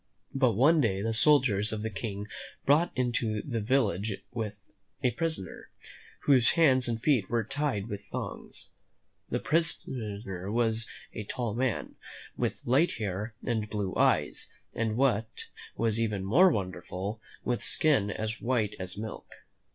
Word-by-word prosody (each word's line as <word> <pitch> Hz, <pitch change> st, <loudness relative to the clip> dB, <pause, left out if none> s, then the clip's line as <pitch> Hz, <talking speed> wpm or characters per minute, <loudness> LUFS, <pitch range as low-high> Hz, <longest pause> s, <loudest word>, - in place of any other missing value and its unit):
But 130 Hz, -4 st, +3 dB
one 150 Hz, +9 st, +5 dB
day 100 Hz, -5 st, +1 dB
the 115 Hz, 0 st, 0 dB
soldiers 115 Hz, -5 st, +4 dB
of 110 Hz, -1 st, -3 dB
the 110 Hz, -, -2 dB
King 100 Hz, 0 st, -4 dB, 0.4 s
brought 155 Hz, +5 st, +4 dB
into 120 Hz, -4 st, 0 dB
the 120 Hz, -5 st, -2 dB
village 105 Hz, -4 st, +1 dB, 0.2 s
a 100 Hz, 0 st, -4 dB
prisoner, 160 Hz, -, -4 dB, 0.5 s
whose 130 Hz, -5 st, +5 dB
hands 135 Hz, -7 st, +4 dB
and 115 Hz, -1 st, -1 dB
feet 125 Hz, -6 st, +2 dB
were 115 Hz, -1 st, +1 dB
tied 125 Hz, -4 st, -2 dB
with 100 Hz, -3 st, -6 dB
thongs. -, -, -6 dB, 0.6 s
This -, -, -2 dB
prisoner 105 Hz, -, -1 dB
was 115 Hz, 0 st, +1 dB, 0.3 s
a 110 Hz, -, -4 dB
tall 120 Hz, -1 st, -3 dB
man, 125 Hz, -1 st, -2 dB, 0.4 s
with -, -, -2 dB
light 140 Hz, +8 st, +3 dB
hair 105 Hz, +1 st, -4 dB
and 110 Hz, -3 st, -1 dB
blue 100 Hz, -3 st, -2 dB
eyes, -, -, +2 dB, 0.2 s
and, 110 Hz, -1 st, -1 dB
what 115 Hz, -5 st, +2 dB, 0.5 s
was 115 Hz, -1 st, +1 dB
even 105 Hz, -4 st, -1 dB
more 170 Hz, -, +6 dB
wonderful, 95 Hz, -, -3 dB, 0.2 s
with 120 Hz, -1 st, -1 dB
skin 135 Hz, -10 st, +2 dB
as 110 Hz, +2 st, -3 dB
white 115 Hz, -4 st, 0 dB
as 95 Hz, 0 st, -6 dB
milk. 110 Hz, 0 st, -7 dB
110 Hz, 140 wpm, -29 LUFS, 105-130 Hz, 0.6 s, more